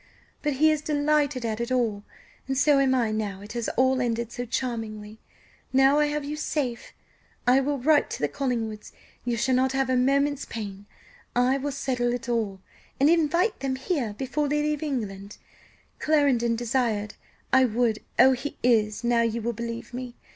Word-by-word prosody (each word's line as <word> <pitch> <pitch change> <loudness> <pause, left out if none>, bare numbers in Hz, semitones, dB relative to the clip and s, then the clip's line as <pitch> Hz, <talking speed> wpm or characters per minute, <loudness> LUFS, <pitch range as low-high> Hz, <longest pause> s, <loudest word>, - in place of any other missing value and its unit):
But 295 -1 0
he 310 +4 +4
is 305 -1 0
delighted 295 -3 +1
at 220 0 -2
it 235 - -3
all, 230 -5 0 0.5
and 270 0 -1
so 285 0 +4
am 265 -1 +3
I 235 -4 +1
now 205 -3 -3
it 210 - -10
has 235 -2 -2
all 260 +1 +3
ended 235 -1 -1
so 245 +1 -4
charmingly, 220 -3 -4 0.5
now 270 +2 +5
I 300 - +3
have 295 -1 -2
you 295 +1 -4
safe. 275 -5 -3 0.5
I 250 +2 +5
will 285 +1 0
write 295 +3 +3
to - - -5
the 150 - +1
Collingwoods; 225 - -3 0.3
you 240 -1 0
shall 260 +3 +1
not 260 +1 +2
have 270 -1 0
a - - +3
moment's 280 +3 +2
pain; 205 -2 -7 0.5
I 250 +2 +3
will 285 +2 -2
settle 250 -3 -1
it 245 -1 -7
all, 215 -5 -1 0.4
and 285 +4 +5
invite 340 +6 +2
them 270 -1 -1
here 260 - -2
before 275 +3 -1
they 295 +1 +1
leave 300 -1 -1
England; 205 -9 -4 0.6
Clarendon 275 -7 +2
desired 230 -3 -1 0.4
I 260 0 +6
would 230 -2 +1 0.2
oh, 265 - +7
he 265 +3 -3
is! 220 -3 +2
now 235 0 +3
you 230 0 0
will 235 +1 -1
believe 230 +1 -6
me! 250 -1 -6
250 Hz, 180 wpm, -26 LUFS, 230-280 Hz, 0.6 s, oh